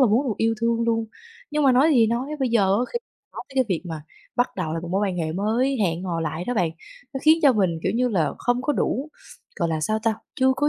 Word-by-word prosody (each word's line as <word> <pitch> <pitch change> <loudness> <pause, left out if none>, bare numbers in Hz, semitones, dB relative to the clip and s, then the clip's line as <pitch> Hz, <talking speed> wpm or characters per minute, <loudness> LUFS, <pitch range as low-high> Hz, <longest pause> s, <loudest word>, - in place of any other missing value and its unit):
là 260 - +6
muốn 235 +6 +2
được 220 - 0
yêu 225 0 +1
thương 230 0 +1
luôn. 230 -1 +1 0.5
Nhưng 300 0 0
mà 270 - +5
nói 270 +6 +5
gì 230 -2 +5
nói, 235 +4 -1
bây 260 - +2
giờ 230 -3 +3 0.2
á - - +1
khi 475 - 0 0.3
nói - - -6
tới 270 - -15
cái 260 -1 +3
việc 180 -5 -1
mà 160 -3 -6 0.3
bắt 245 0 0
đầu 170 -5 -2
lại 165 - -2
một 170 - -6
mối 195 +2 +1
quan 185 - -3
hệ 160 -2 -2
mới, 230 +9 +1
hẹn 175 -2 0
hò 170 -3 -2
lại 160 +2 -3
đó 245 - -2
bạn, 180 -7 +1 0.4
nó - - -1
khiến 315 +1 +6
cho 280 - +7
mình, 185 -7 +1
kiểu - - 0
như 250 +1 +2
là, 175 -9 +1
không 245 +1 0
có 295 - +1
đủ, 275 +2 -1 0.5
gọi 170 - 0
là, 160 -1 -1
sao 215 +8 0
ta? 225 -1 +2 0.2
Chưa 265 -1 +3
có 295 - +2
225 Hz, 275 wpm, -24 LUFS, 180-255 Hz, 0.5 s, cho